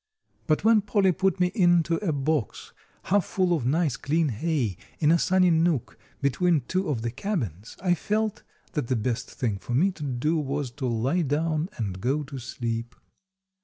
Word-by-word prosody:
But 155 +1 +2
when 220 -1 +5
Polly 200 -2 +2
put 190 +1 0
me 180 0 +2
into 175 -4 +3
a 190 -4 -1
box 145 -3 -2 0.3
half 200 +1 +2
full 180 -1 +1
of 130 -7 -2
nice, 150 -2 +1
clean 155 +3 +1
hay, 125 - -1 0.2
in 150 0 +3
a 170 - +4
sunny 185 0 +3
nook 160 -5 +1 0.3
between 160 +3 +2
two 185 +8 -2
of 120 -6 -1
the 120 - -1
cabins, 120 - -4
I 180 -2 +4
felt 215 +5 -1 0.3
that 150 -8 -2
the 130 - +1
best 120 +2 -2
thing 110 -6 -2
for 120 - -4
me 185 +9 +3
to 175 - -14
do 145 +4 0
was 140 -2 -2
to 130 0 -4
lie 125 +9 +1
down 155 +2 0
and 95 -5 -4
go 140 +5 0
to 135 -1 -7
sleep. 115 -1 -4
150 Hz, 180 wpm, -26 LUFS, 125-175 Hz, 0.3 s, when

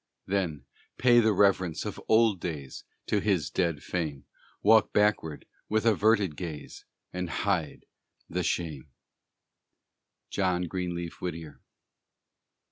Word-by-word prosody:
Then, 90 -6 -2 0.3
pay 120 -1 +6
the 110 -1 +4
reverence 95 -4 +2
of - - -5
old 110 -3 +4
days 75 -7 -6 0.2
To 105 - +1
his 95 -6 0
dead 85 -5 0
fame; 75 -7 -3 0.4
Walk 110 0 +5
backward, 105 -7 +1 0.2
with 110 +1 +1
averted 105 -5 +3
gaze, 80 -4 -7 0.3
And 90 -1 -3
hide 90 -3 -1 0.4
the 90 - -2
shame! 80 -6 -2 1.4
JOHN 90 -2 +1
GREENLEAF 85 -1 -4
WHITTIER. 80 -6 -6
90 Hz, 110 wpm, -28 LUFS, 80-105 Hz, 1.4 s, pay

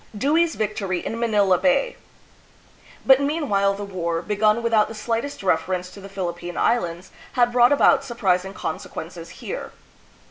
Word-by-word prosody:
Dewey's 320 +8 +2
Yictory 200 -4 -2
in 230 - -4
Manila 205 -6 +3
Bay. 480 - +2 1.1
But 265 0 +6
meanwhile 275 -10 +1
the 205 - -6
war, 170 -4 -3
begun 215 +2 +1
without 225 -2 +3
the 225 - -8
slightest 230 +4 -3
reference 180 +1 0
to 200 - -12
the 195 - -10
Philippine 175 -2 -5
Islands, 175 -6 0 0.2
had 245 -1 +3
brought 245 +1 +5
about 285 - +4
surprising 195 -6 -1
conse - - -5
quences - - -8
here. - - -7
210 Hz, 145 wpm, -23 LUFS, 185-240 Hz, 1.1 s, But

